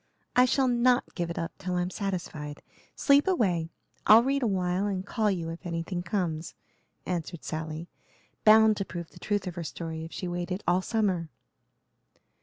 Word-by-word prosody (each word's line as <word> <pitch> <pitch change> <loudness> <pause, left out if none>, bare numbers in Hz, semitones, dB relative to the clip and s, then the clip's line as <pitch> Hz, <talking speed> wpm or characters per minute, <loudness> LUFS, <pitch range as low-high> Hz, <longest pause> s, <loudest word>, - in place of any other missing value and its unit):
"I 250 +1 +7
shall 260 +1 +2
not 245 +1 +2
give 175 -2 -2
it 170 - -5
up 165 - -2
till 180 -1 -3
I'm 180 +1 0
satisfied. 170 -7 -4 0.3
Sleep 285 +4 +4
away, 185 - +1 0.4
I'll 225 +2 +9
read 275 +2 +1
awhile 190 -3 +1
and 190 -2 -2
call 215 0 +1
you 170 -4 -2
if 165 +2 -7
anything 175 +1 -3
comes," 170 -3 -2 0.5
answered 170 -2 -4
Sally, 160 +1 -4 0.6
bound 220 0 +7
to 195 - -1
prove 170 -3 -7
the - - -14
truth 205 -2 -1
of 180 - -4
her 170 0 -5
story 160 0 -5
if 165 - -8
she 180 - -4
waited 175 +2 -3
all 180 +1 +3
summer. 185 -6 0
180 Hz, 170 wpm, -28 LUFS, 170-215 Hz, 0.6 s, I'll